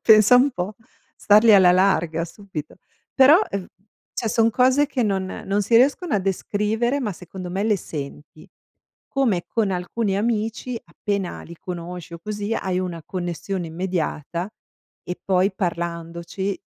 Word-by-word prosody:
pensa 215 +2 +7
un 265 +3 +4
po', 195 0 -4 0.4
stargli 215 +2 +5
alla 185 -3 +7
larga 170 -3 +2
subito. 170 -4 -8 0.4
Però, 285 +8 +7
uhm, 195 -2 -3 0.5
cioè 225 - -2
son 225 +1 +3
cose, 255 +5 +3
che 275 -3 -1
non 195 -3 0 0.2
non 200 +1 +1
si 230 - 0
riescono 285 +6 +3
a 210 - +3
descrivere, 210 +7 0
ma 215 -6 -2
secondo 180 +1 -8
me 195 +3 -1
le 215 -2 +3
senti. 150 -1 -8 0.7
Come 230 -11 +1
con 215 -4 0
alcuni 190 +3 -1
amici, 225 +3 -1
appena 200 -3 -4
li 170 - -10
conosci 175 -1 -7
o 170 - -8
così, 210 +2 -3
hai 185 -3 -1
una 175 -3 -4
connessione 180 0 -4
immediata 170 0 -3 0.5
e 180 - -6
poi 190 +1 +2
parlandoci, 170 +2 -3
195 Hz, 145 wpm, -23 LUFS, 175-220 Hz, 0.7 s, pensa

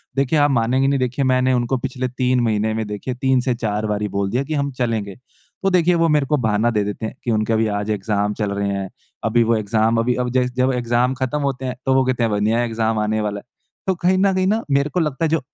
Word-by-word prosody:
देखिए 140 +3 +2
आप 145 0 +4
मानेंगे 130 +2 +2
नहीं 140 -1 +1
देखिए 125 +2 -1
मैंने 130 0 +2
उनको 125 +1 0
पिछले 130 0 -3
3 125 0 0
महीने 110 -1 0
में 110 0 -2
देखिए 105 +5 -4
3-4 125 -5 0
बारी 105 0 -1
बोल 100 0 -2
दिया 130 +3 0
कि 155 - -5
हम 140 -1 -1
चलेंगे। 115 -6 -2 0.5
तो 195 - +3
देखिए 180 -1 +3
वो 165 0 +3
मेरे 150 -2 +2
को 150 +2 +1
बहाना 110 -1 +1
दे 105 -2 +1
देते 105 +2 -4
हैं 110 - -6
कि 120 - -1
उनके 110 +1 +1
अभी 110 0 +2
आज 105 0 -2
एग्ज़ाम 105 0 -1
चल 105 -2 -2
रहे 100 0 -1
हैं। 100 -1 -3 0.3
अभी 115 +1 +3
वो 115 +1 +2
एग्ज़ाम 110 +2 +1
अभी 120 +2 +1
अभी 125 -1 -2
जब 130 - +2
जै 125 - 0
जब 130 +1 +3
एग्ज़ाम 120 +1 +1
ख़त्म 130 +3 -1
होते 135 -2 -2
हैं 125 0 -3
तो 135 - +3
वो 130 - +4
कहते 130 -2 0
हैं 115 - +2
अब 105 - +1
नया 115 +3 +2
एग्ज़ाम 115 -1 -1
आने 110 0 0
वाला 105 -1 -2
है। - - -16 0.4
तो 190 - +2
कहीं 180 +2 +2
न 195 0 +3
कहीं 185 0 +1
न 220 +3 +1
मेरे 140 +1 +2
को 180 - -1
लगता 150 -1 0
है - - 0
जो 165 +1 +2
125 Hz, 265 wpm, -20 LUFS, 110-135 Hz, 0.5 s, आप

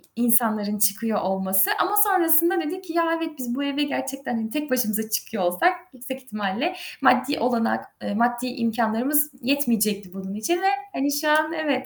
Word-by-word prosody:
insanların 225 -3 +2
çıkıyor 210 +2 +1
olması 190 0 +2
ama 405 +2 +1
sonrasında 360 -3 +4
dedik 355 +4 -5
ki: 330 -3 -8
"Ya, 335 0 +2
evet, 325 -1 -4
biz 245 -1 -4
bu 285 - -3
eve 280 +1 -1
gerçekten 275 -3 -4
hani 220 -1 -3
tek 300 +1 -4
başımıza 220 -3 0
çıkıyor 215 -2 -2
olsak 180 - +2 0.2
yüksek 260 +1 -8
ihtimalle 215 - -3 0.3
maddi 290 - +3
olanak, 235 -1 0 0.2
eee, - - -4
maddi 240 +2 0
imkânlarımız 245 +5 0
yetmeyecekti 220 -8 0
bunun 195 0 -7
için 220 +11 0
ve 385 - +2 0.3
hani 280 +2 -1
şu 305 - 0
an 310 +1 +2
evet, 285 -5 -1
245 Hz, 165 wpm, -23 LUFS, 220-300 Hz, 0.3 s, sonrasında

